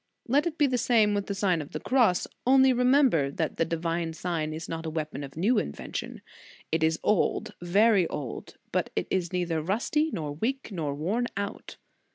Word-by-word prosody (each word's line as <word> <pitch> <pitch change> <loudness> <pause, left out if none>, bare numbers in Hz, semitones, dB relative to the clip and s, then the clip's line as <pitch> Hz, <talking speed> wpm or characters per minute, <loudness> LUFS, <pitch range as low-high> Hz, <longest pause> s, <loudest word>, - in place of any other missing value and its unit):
Let 285 +7 +3
it 330 -1 -4
be 295 - +4
the 255 -3 +1
same 225 -3 +3
with 200 -1 -1
the 200 - -3
Sign 185 -4 +1
of 145 - -10
the 155 - -3
Cross; 235 -7 +2 0.2
only 265 0 +6
remember 250 - +3
that 155 +3 -3
the 165 - +2
divine 165 0 -2
sign 160 -2 -2
is 160 +1 -6
not 165 0 -5
a - - -1
weapon 155 -2 -4
of 140 +2 -9
new 215 +8 +3
invention. 70 - -5 0.5
It 160 0 +1
is 160 0 +2
old, 210 - +1
very 195 +1 +4
old, 135 -5 -6
but - - 0
it - - 0
is 180 -3 0
neither 175 -3 -1
rusty, 240 - 0
nor 155 -6 -3
weak, 240 - -3
nor 155 -7 -3
worn 205 +12 -1
out. 200 0 -5
180 Hz, 195 wpm, -27 LUFS, 160-235 Hz, 0.5 s, only